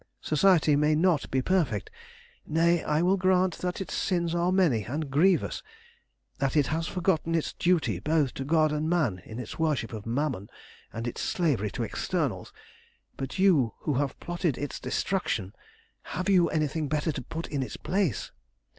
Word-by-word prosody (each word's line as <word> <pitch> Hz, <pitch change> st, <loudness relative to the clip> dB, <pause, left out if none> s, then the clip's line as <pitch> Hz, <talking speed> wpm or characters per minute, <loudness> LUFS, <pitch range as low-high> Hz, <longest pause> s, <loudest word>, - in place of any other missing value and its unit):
Society 155 Hz, -2 st, +4 dB
may 150 Hz, +1 st, +3 dB
not 165 Hz, -1 st, +2 dB
be 130 Hz, -1 st, 0 dB
perfect, 155 Hz, -, 0 dB, 0.6 s
nay, 165 Hz, +2 st, +2 dB
I 150 Hz, +3 st, +1 dB
will 190 Hz, +2 st, +3 dB
grant 185 Hz, -1 st, +2 dB
that 180 Hz, 0 st, -3 dB
its 195 Hz, -, -5 dB
sins 170 Hz, -3 st, 0 dB
are 175 Hz, +1 st, +1 dB
many 165 Hz, -, +3 dB
and 145 Hz, +3 st, -4 dB
grievous, 170 Hz, +4 st, +2 dB, 0.8 s
that 140 Hz, +3 st, 0 dB
it 145 Hz, -, +4 dB
has 165 Hz, 0 st, -1 dB
forgotten 165 Hz, -2 st, 0 dB
its 165 Hz, -, -1 dB
duty 155 Hz, -, +1 dB
both 150 Hz, -, +1 dB
to 135 Hz, -, -4 dB
God 155 Hz, +1 st, +3 dB
and 150 Hz, +1 st, -1 dB
man 135 Hz, -, +1 dB
in 110 Hz, -, -8 dB
its 125 Hz, -, -7 dB
worship 150 Hz, -8 st, 0 dB
of 110 Hz, 0 st, -7 dB
Mammon 120 Hz, -5 st, -2 dB, 0.4 s
and 115 Hz, +1 st, -5 dB
its 120 Hz, -, -4 dB
slavery 140 Hz, -, 0 dB
to -, -, -4 dB
externals, -, -, -2 dB, 0.6 s
but 135 Hz, -1 st, -5 dB
you 170 Hz, -, +3 dB
who 150 Hz, -, -1 dB
have 140 Hz, +1 st, -1 dB
plotted 175 Hz, -5 st, -2 dB
its 145 Hz, -, -4 dB
destruction, 110 Hz, -, -2 dB, 0.5 s
have 185 Hz, +4 st, -4 dB
you 180 Hz, -3 st, +4 dB
anything 155 Hz, 0 st, -1 dB
better 150 Hz, +2 st, 0 dB
to -, -, -5 dB
put 160 Hz, +6 st, -6 dB
in 140 Hz, -3 st, -3 dB
its 130 Hz, -, -5 dB
place? 185 Hz, -, -1 dB
155 Hz, 170 wpm, -28 LUFS, 135-175 Hz, 0.8 s, Society